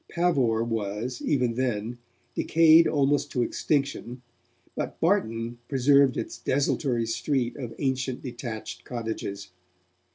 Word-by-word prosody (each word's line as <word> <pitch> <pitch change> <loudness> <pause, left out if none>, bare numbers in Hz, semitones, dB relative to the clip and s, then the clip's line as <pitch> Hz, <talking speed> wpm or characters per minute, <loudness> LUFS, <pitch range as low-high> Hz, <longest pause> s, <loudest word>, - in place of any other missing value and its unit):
Pavor 135 -11 +2
was, 115 +2 -3
even 125 -5 +1
then, 120 -1 -2 0.3
decayed 165 0 +5
almost 145 0 +1
to 125 - +2
extinction, 130 -2 -2 0.5
but - - -4
Barton 115 +1 0
preserved 140 0 +4
its - - -4
desultory 130 -3 0
street 120 +2 -1
of 120 -5 -6
ancient, 130 -2 -2
detached 120 -3 -6
cottages. 110 -4 -5
125 Hz, 105 wpm, -26 LUFS, 115-140 Hz, 0.5 s, decayed